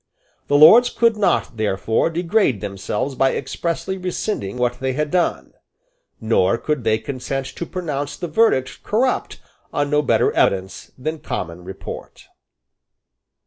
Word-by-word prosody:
The 145 - +3
Lords 230 +12 +8
could 230 -2 +2
not 200 - 0
therefore 110 +6 0
degrade 170 - +1
themselves 105 +6 -3
by 135 0 +2
expressly 170 +7 -3
rescinding 180 - -3
what 125 -1 -1
they 130 0 -1
had 150 +2 -2
done; 180 -2 0 0.7
nor 110 -2 +2
could 150 0 -2
they 110 -1 +2
consent 130 +3 -4
to 170 - -5
pronounce 145 -6 -4
the 175 - -4
verdict 155 - +1
corrupt 250 +5 -1 0.3
on 145 0 -1
no 150 0 +3
better 145 - +2
evidence 95 0 0
than 155 +5 -4
common 90 - -5
report. 95 +1 -9
140 Hz, 135 wpm, -21 LUFS, 110-175 Hz, 0.7 s, Lords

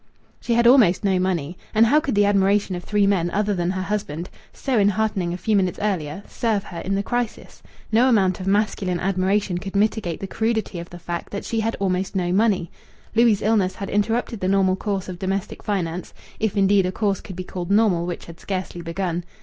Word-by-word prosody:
She 235 - 0
had 235 0 +3
almost 235 -8 +6
no 190 -2 +2
money. 175 -3 -1 0.2
And 220 +1 +6
how 285 +7 +5
could 280 -7 -2
the 205 0 +4
admiration 200 0 +2
of 175 - -6
three 205 +1 +2
men 185 -4 +2
other 205 +2 0
than 175 -2 -1
her 185 0 -2
husband 190 -5 -3 0.2
(so 260 -5 -1
enheartening 205 -3 +1
a 175 - -3
few 210 +4 0
minutes 185 -3 +1
earlier) 195 -3 -2
serve 220 -4 -1
her 170 - -8
in 195 +3 -2
the 200 - 0
crisis? 240 +1 -4 0.3
No 240 +4 +4
amount 190 -6 +3
of 185 - -5
masculine 195 -3 +1
admiration 190 0 0
could 195 +2 -7
mitigate 205 -4 0
the - - -4
crudity 220 -2 -1
of 170 - -8
the 175 - -10
fact 170 0 -5
that 200 - -5
she 225 - -1
had 225 +1 -1
almost 190 0 -1
no 175 -2 0
money. 195 -4 +2 0.4
Louis' 225 -3 +4
illness 205 -4 +2
had 195 - -6
interrupted 225 +2 0
the 185 - -1
normal 190 -1 +3
course 195 -1 -3
of 180 -2 -7
domestic 195 +1 -3
finance 180 -4 -3 0.2
if, 215 -2 -1
indeed, 195 -1 +4
a - - -1
course 200 -1 -1
could 190 - -9
be 185 - -5
called 180 -1 -6
normal 200 -5 +3
which 175 - -5
had 165 -1 -12
scarcely 185 -3 -4
begun. 175 0 -3
195 Hz, 210 wpm, -23 LUFS, 180-210 Hz, 0.4 s, almost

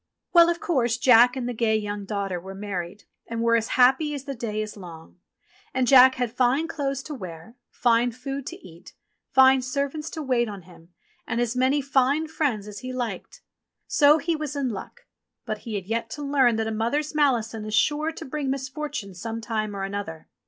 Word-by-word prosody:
Well, 340 -1 +7
of 345 0 -1
course. 245 -8 0
Jack 245 0 +6
and 250 -2 -3
the 245 - -3
gay 220 -1 +1
young 205 -1 -4
daughter 195 -3 -3
were 190 +2 -9
married, 195 -1 -5 0.2
and 230 0 -4
were 230 0 +4
as 225 -1 +1
happy 265 +4 +4
as 275 - -6
the 280 -1 -5
day 225 -4 -4
is 215 0 -4
long; 170 -3 -12 0.6
and 260 -1 +2
Jack 260 0 +7
had 245 -2 -2
fine 255 +6 +2
clothes 275 -4 -3
to 305 - -7
wear, 185 - -9
fine 240 0 +2
food 270 +3 -6
to - - -5
eat, 170 0 -15 0.3
fine 265 0 +6
servants 280 +4 -3
to 315 -2 -6
wait 245 -4 +1
on 200 -3 -8
him, 170 -1 -17 0.4
and 235 - -1
as 240 0 -1
many 260 +3 +2
fine 275 +3 +2
friends 270 -10 -1
as 205 -1 -8
he 255 +3 -6
liked. 250 -2 -5 0.4
So 295 +1 +5
he 325 +2 -1
was 300 -2 -4
in 275 -3 -1
luck; 205 -4 -8 0.4
but 215 -1 -3
he 215 - -3
had 195 -2 -4
yet 225 +2 -2
to 295 - -6
learn 270 -4 +3
that 220 0 -1
a 220 - -2
mother's 240 +8 -1
malison 235 -7 +1
is 215 0 -3
sure 300 +8 +2
to 325 - -9
bring 280 0 -3
misfortune 265 -5 -4
some 225 +6 -5
time 215 -2 -3
or 195 - -4
another. 195 -5 -5
245 Hz, 200 wpm, -25 LUFS, 215-275 Hz, 0.6 s, Well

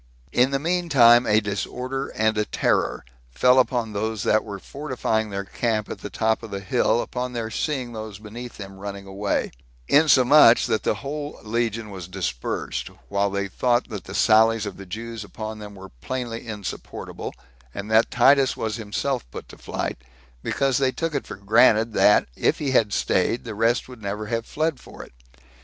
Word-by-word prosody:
In 125 +2 +4
the 140 - 0
mean 175 +4 -1
time, 120 -3 +6
a 105 0 +5
disorder 125 +6 -3
and 110 0 +2
a 105 - +1
terror - - 0 0.2
fell 125 - +4
again - - +9
upon 120 -4 -2
those 110 0 -2
that 110 - +3
were 100 -2 -6
fortifying 125 -3 -2
their 100 0 -3
camp 110 +1 -2
at - - -6
the 105 - -7
top 110 +3 0
of 115 - -8
the 100 -1 -4
hill, 115 +4 +1
upon 125 0 -4
their 115 -2 -3
seeing 130 -1 -2
those 110 -3 -7
beneath 115 +4 -9
them 95 -2 -9
running 100 0 -7
away; 100 +1 -2 0.4
insomuch 140 -4 +6
that 110 - 0
the - - 0
whole 145 +1 -6
legion 115 -1 -2
was 90 -3 -7
dispersed, 90 -11 -3 0.2
while 100 0 +1
they 100 0 -2
thought 120 +5 0
that 105 -5 -6
the 95 - -8
sallies 110 0 +4
of 100 - -6
the 100 - -10
Jews 115 +3 -6
upon 110 +1 -7
them 105 -1 -9
were 95 0 -11
plainly 120 -2 -4
insupportable, 105 -3 -6 0.4
and 100 - -6
that 110 +1 +4
Titus 135 +2 +4
was 110 -1 -2
himself 115 - -3
put - - -9
to - - -12
flight; - - -4 0.4
because 135 -2 0
they 135 -1 +2
took 165 +3 -3
it 140 - -3
for - - -6
granted, 110 +3 +4
that, 105 - +5
if - - +1
he 140 -3 -2
had 110 -5 +3
staid, 100 +4 +1
the 115 - -6
rest 115 +3 +1
would 125 -3 -12
never 105 +1 -4
have 115 +1 -3
fled 155 -1 -1
for - - -11
it. - - -16
110 Hz, 185 wpm, -24 LUFS, 105-125 Hz, 0.4 s, again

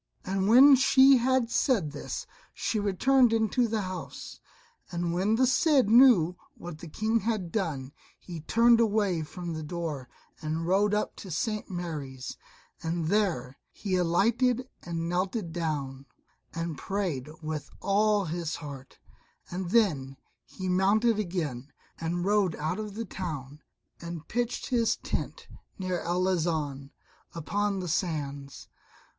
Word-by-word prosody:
And 190 0 0
when 265 +6 +9
she 265 +1 +6
had 250 -1 +1
said 200 - +1
this 145 - -5 0.3
she 220 - -1
returned 235 +6 +3
into 225 +2 +2
the 220 -1 -1
house. 185 -1 -7 0.5
And 170 -1 -2
when 195 +5 +2
the 260 +3 +4
Cid 265 -2 +3
knew 225 -9 +6 0.2
what 170 -3 -8
the 170 - -9
King 220 +8 0
had 215 -6 -2
done 150 -10 -2 0.3
he 170 -3 -8
turned 230 +7 +4
away 205 -6 +2
from 170 +2 -6
the 160 - -4
door 150 -5 -5 0.3
and 160 +2 -2
rode 200 +4 +2
up 210 - -1
to 195 - -9
St. 210 +6 -2
Mary's, 150 -8 -5 0.5
and 165 -1 -2
there 170 -12 0
he 195 -3 -3
alighted 230 +9 +2
and 165 -1 -4
knelt 185 +5 0
down, 140 -5 -3 0.4
and 165 -2 -4
prayed 180 -9 -2
with 155 -1 -4
all 205 0 +2
his 165 0 -3
heart; 140 -3 -9 0.5
and 180 0 -3
then 150 - +2 0.3
he 185 - -7
mounted 205 +5 +3
again 155 -9 -3 0.3
and 175 +2 -2
rode 200 -4 +2
out 160 +6 -2
of 210 -2 -6
the 230 +1 -4
town 150 -7 -6 0.4
and 170 -2 -7
pitched 240 +1 -2
his 235 -3 +2
tent - - -5 0.3
near 185 -2 -2
Arlanzon, 165 -6 -1 0.5
upon 200 +4 -1
the 180 - -4
sands. 145 -5 -3
180 Hz, 135 wpm, -28 LUFS, 160-215 Hz, 0.5 s, when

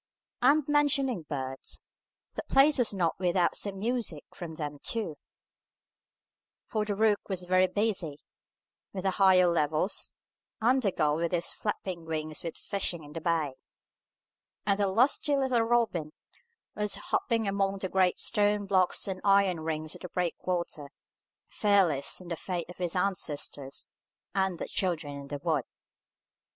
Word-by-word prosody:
And 280 +3 +4
mentioning 275 - +2
birds, 135 -2 -4 0.5
the - - -3
place 275 +1 +5
was 240 - +2
not 175 -5 0
without 175 -1 +2
some 200 -1 -1
music 220 -7 -2
from 165 -3 -7
them 150 -2 -5
too; 215 -9 -2 1.5
for 215 -2 -1
the 205 -1 -1
rook 215 0 +3
was 185 -2 -1
very 185 +1 +4
busy 190 -8 -1 0.8
on 185 - -3
the 190 - +2
higher 185 -1 +7
levels, 160 +1 +1 0.5
and 250 +4 +3
the 200 -5 +1
gull 150 -3 +1
with 170 0 -1
his 175 -1 0
flapping 185 -5 -4
wings 155 -1 -3
was 165 - -5
fishing 190 -5 -3
in 145 0 -12
the 165 - -5
bay, 160 -4 0 1.1
and 200 0 +2
the 200 - +3
lusty 255 +8 +3
little 260 -3 +2
robin 225 -10 +1 0.6
was 210 -1 0
hopping 225 -2 0
among 195 0 0
the 190 - -3
great 185 -1 +2
stone 205 0 +1
blocks 190 -1 +2
and 185 -1 -4
iron 195 -3 +4
rings 155 -1 -3
of - - -12
the 180 - -7
breakwater, 175 -4 -2 0.6
fearless 190 -9 +2
in 180 -2 -11
the 170 - -1
faith 175 +1 -4
of 180 - -10
his 175 -1 -2
ancestors, 150 -7 -2 0.5
and 190 -2 +1
the - - -4
Children 165 -6 -1
in 140 - -9
the 145 0 -4
Wood. 155 -3 0
185 Hz, 150 wpm, -29 LUFS, 160-205 Hz, 1.5 s, higher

